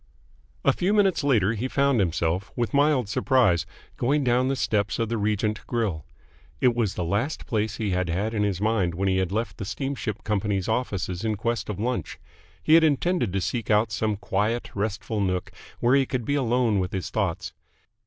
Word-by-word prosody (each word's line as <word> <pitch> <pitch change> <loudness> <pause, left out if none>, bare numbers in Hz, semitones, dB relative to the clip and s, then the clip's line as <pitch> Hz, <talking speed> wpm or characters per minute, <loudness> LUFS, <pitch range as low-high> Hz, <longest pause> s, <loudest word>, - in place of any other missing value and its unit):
A - - +5
few 195 +4 +1
minutes 195 -6 +3
later 115 -7 +3
he 115 +3 -2
found 140 -2 +2
himself, 85 0 0
with 120 -2 -2
mild 140 -4 +3
surprise, 105 - +2 0.3
going 140 +4 +1
down 125 0 +2
the 135 - +1
steps 105 -5 0
of 115 -2 -1
the 115 - -1
Regent 105 +1 0
Grill. 105 - -2 0.5
It 125 -3 +4
was 115 -5 -1
the 90 - -2
last 105 - -1
place 110 -3 -1
he 105 -3 -1
had 90 -1 0
had 100 +7 -1
in 105 - 0
his 100 -4 0
mind 105 -5 +1
when 95 +3 -1
he 95 0 +2
had 95 -1 0
left 110 +3 -2
the - - -3
steamship 110 -2 -4
company's 100 -2 -1
offices 100 -6 -2
in 110 -1 0
quest 115 0 -2
of 100 -2 -4
lunch. 125 +3 -2 0.5
He 155 - +3
had 165 0 +7
intended 160 - +1
to 95 - 0
seek 115 +3 -3
out 105 +1 +3
some 110 0 0
quiet, 115 +2 -1
restful 105 +1 -2
nook 90 -2 -1 0.3
where 120 +2 +3
he 135 -2 +3
could 125 -4 -2
be 140 - 0
alone 120 -5 +2
with 90 -1 -2
his 95 -5 -3
thoughts. - - -2
110 Hz, 195 wpm, -25 LUFS, 100-125 Hz, 0.5 s, had